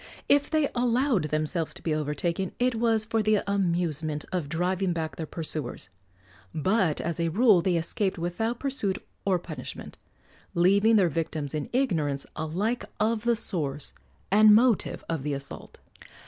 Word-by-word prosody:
If 285 0 +3
they 310 -2 +2
allowed 245 - +2
themselves 155 +2 -1
to - - -13
be 160 - 0
overtaken 155 +5 -2
it 250 0 +2
was 225 -1 +1
for 225 +1 0
the 215 -1 +2
amusement 170 -6 -1
of 175 -6 -2
driving 180 +3 0
back 160 -2 -3
their 160 - -5
pursuers; 150 - -4 0.7
but 185 0 +1
as 170 0 -3
a 170 0 +1
rule 205 0 +5
they 180 0 +1
escaped 180 +4 -1
without 200 +8 -2
pursuit 235 -9 -1 0.3
or 190 -2 +3
punishment, 175 - -8 0.6
leaving 200 +6 +4
their 195 -4 +5
victims 155 -2 -3
in 150 -2 -3
ignorance 160 - 0
alike 195 +10 -1 0.2
of 220 +1 0
the 235 0 +3
source 155 -10 -3 0.4
and 210 +1 +7
motive 235 -2 +2
of 165 -4 -2
the 145 +1 -2
assault. 140 0 -8
180 Hz, 150 wpm, -27 LUFS, 160-220 Hz, 0.7 s, and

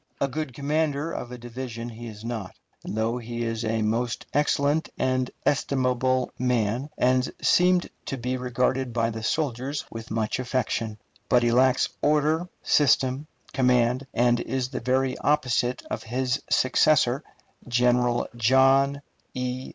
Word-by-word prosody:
A 140 - +1
good 150 +1 -4
commander 150 +2 -1
of 125 - -5
a 125 - -6
division 120 -1 -6
he 120 0 -8
is 110 0 -10
not, 115 -5 -5 0.3
though 110 +3 -1
he 120 0 -5
is 115 0 -2
a 110 0 0
most 115 +2 -1
excellent 145 +1 +1
and 130 -1 0 0.2
estimable 130 -2 +1
man, 125 +1 0
and 125 0 +2
seemed 180 0 +3 0.2
to 135 - -3
be 125 +1 -2
regarded 125 0 -1
by 115 -1 +1
the 110 0 -6
soldiers 135 +2 -2
with 115 -1 -8
much 110 +2 -1
affection. 120 -4 -2 0.3
But 125 -1 +4
he 120 - +3
lacks 130 +2 +4
order, 155 +3 +2
system, 135 0 +2 0.3
command, 125 0 +2
and 120 0 +2
is 130 +1 -2
the 130 - -4
very 130 0 0
opposite 125 -4 +1
of - - -2
his 130 +3 -1
successor, 130 +1 +3 0.5
General 120 0 +2
John 135 +4 +4 0.3
E. 125 0 -3
125 Hz, 140 wpm, -25 LUFS, 120-135 Hz, 0.5 s, But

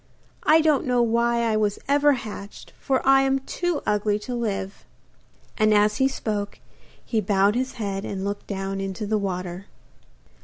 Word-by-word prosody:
I 320 +1 +5
don't 305 -4 +2
know 245 -1 +3
why 235 +1 +1
I 225 -2 +1
was 210 -1 +1
ever 290 +1 +4
hatched, 215 -5 -8
for 265 -2 0
I 270 0 +6
am 270 0 +2
too 335 +4 -3
ugly 210 0 +1
to 250 - -4
live.' 205 -5 -3 0.8
And 215 0 +4
as 210 0 +3
he 265 0 +3
spoke, 210 -6 -4 0.5
he 225 -3 0
bowed 200 0 +2
his 255 +3 -2
head 200 -5 -4
and 195 -1 -4
looked 200 0 -4
down 195 -1 -3
into 195 +2 -4
the 215 +1 0
water. 185 -1 -4
215 Hz, 165 wpm, -24 LUFS, 200-260 Hz, 0.8 s, I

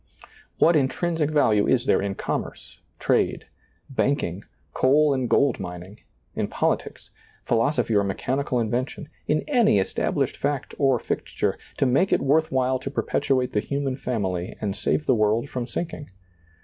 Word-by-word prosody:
What 170 - +5
intrinsic 155 +2 +1
value 110 -9 +3
is 125 -1 +2
there - - +3
in 100 0 -2
commerce, - - -5 0.2
trade, - - +1 0.4
banking, 125 -9 -1 0.3
coal 145 +3 +4
and 130 -3 -1
gold 140 -4 +3
mining, 90 +3 -8 0.3
in - - -1
politics, - - -2 0.4
philoso 120 +2 +2
phy 115 - -2
or 100 -1 +4
mechanical 125 +7 -1
invention, 125 - -2 0.2
in 155 +1 +1
any 240 - +4
established 95 - -1
fact 140 -1 -2
or 135 -3 +4
fixture, - - -2 0.2
to - - +2
make 140 +10 +2
it - - +4
worth 155 +4 +2
while 130 0 +1
to 135 - -5
perpetuate 135 -2 0
the 105 - +2
human 140 +3 -2
family 95 -9 -3
and 100 -2 -2
save 150 - -1
the - - +4
world 110 +3 +1
from 125 -2 -3
sinking 155 +2 -5
130 Hz, 150 wpm, -24 LUFS, 110-145 Hz, 0.4 s, What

